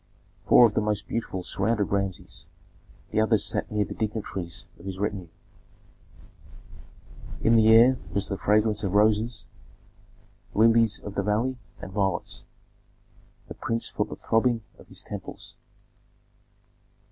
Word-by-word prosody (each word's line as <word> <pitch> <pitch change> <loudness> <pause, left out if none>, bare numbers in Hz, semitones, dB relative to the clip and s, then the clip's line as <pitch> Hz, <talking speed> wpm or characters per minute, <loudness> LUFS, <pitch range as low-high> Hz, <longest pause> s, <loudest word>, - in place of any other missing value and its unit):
Four 120 - +8
of 110 - +2
the 110 - +1
most 105 -1 -1
beautiful 95 -5 -3
surrounded 105 +3 0
Rameses; 100 -2 -3 0.6
the 110 - +2
others 110 -1 +3
sat - - -1
near 105 -1 +1
the - - -7
dignitaries 105 -5 -4
of 85 - -14
his 95 -1 -5
retinue. 100 -3 -3 2.2
In 115 - +5
the 110 -1 +5
air 120 +3 +7
was 100 -1 0
the 100 - -2
fragrance 105 +2 +2
of 95 -2 -1
roses, 110 +2 +2 1.1
lilies 115 0 +4
of 100 - -8
the 100 - 0
valley, 110 +6 0 0.2
and 95 - -7
violets; 95 -2 -2 1.0
the - - -7
prince 115 0 -2
felt - - -2
the - - -6
throbbing 115 0 +1 0.2
of - - -16
his - - -6
temples. - - -7
105 Hz, 135 wpm, -26 LUFS, 100-115 Hz, 2.2 s, Four